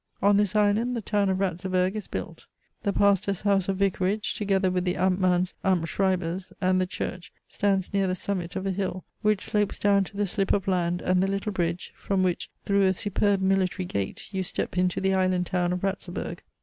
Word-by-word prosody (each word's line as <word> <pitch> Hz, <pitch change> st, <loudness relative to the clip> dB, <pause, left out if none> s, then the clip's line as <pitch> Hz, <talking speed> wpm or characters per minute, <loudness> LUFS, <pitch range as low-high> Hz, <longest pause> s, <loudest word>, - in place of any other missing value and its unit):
On 200 Hz, +1 st, +4 dB
this 205 Hz, 0 st, +2 dB
island 210 Hz, +4 st, +2 dB
the 230 Hz, -, -2 dB
town 205 Hz, -2 st, +1 dB
of 190 Hz, -, +1 dB
Ratzeburg 185 Hz, 0 st, 0 dB
is 215 Hz, -, -4 dB
built. -, -, -6 dB, 0.3 s
The 200 Hz, -, 0 dB
pastor's 200 Hz, -1 st, +2 dB
house 200 Hz, -2 st, +2 dB
or -, -, +2 dB
vicarage, 195 Hz, +1 st, 0 dB
together 195 Hz, -3 st, +1 dB
with 180 Hz, 0 st, 0 dB
the 180 Hz, -1 st, 0 dB
Amtmann's 185 Hz, -1 st, +2 dB
Amtsschreiber's, 185 Hz, 0 st, 0 dB
and 185 Hz, 0 st, +2 dB
the 185 Hz, -, 0 dB
church, 180 Hz, 0 st, -5 dB, 0.2 s
stands 195 Hz, -2 st, 0 dB
near 195 Hz, -1 st, +2 dB
the 185 Hz, -, 0 dB
summit 180 Hz, -2 st, -3 dB
of 190 Hz, -, -3 dB
a 195 Hz, -, +1 dB
hill, 185 Hz, -1 st, -3 dB, 0.2 s
which 210 Hz, -1 st, +2 dB
slopes 205 Hz, -1 st, 0 dB
down 200 Hz, -1 st, +3 dB
to 200 Hz, -, -11 dB
the 205 Hz, -, +1 dB
slip 195 Hz, +1 st, 0 dB
of 195 Hz, -2 st, 0 dB
land 175 Hz, -2 st, 0 dB
and 185 Hz, 0 st, +2 dB
the 190 Hz, -, +2 dB
little 195 Hz, +2 st, -2 dB
bridge, 175 Hz, -2 st, -2 dB
from 195 Hz, -1 st, 0 dB
which, 180 Hz, -2 st, -1 dB, 0.2 s
through 200 Hz, -1 st, +3 dB
a 190 Hz, -, +3 dB
superb 205 Hz, +1 st, +1 dB
military 190 Hz, -1 st, +1 dB
gate, 100 Hz, -, -4 dB
you 190 Hz, -, -1 dB
step 185 Hz, -, -3 dB
into 180 Hz, 0 st, +1 dB
the 190 Hz, 0 st, +1 dB
island 185 Hz, -1 st, +2 dB
town 180 Hz, -1 st, 0 dB
of 180 Hz, +1 st, -3 dB
Ratzeburg. 195 Hz, -2 st, -3 dB
190 Hz, 200 wpm, -26 LUFS, 180-200 Hz, 0.3 s, On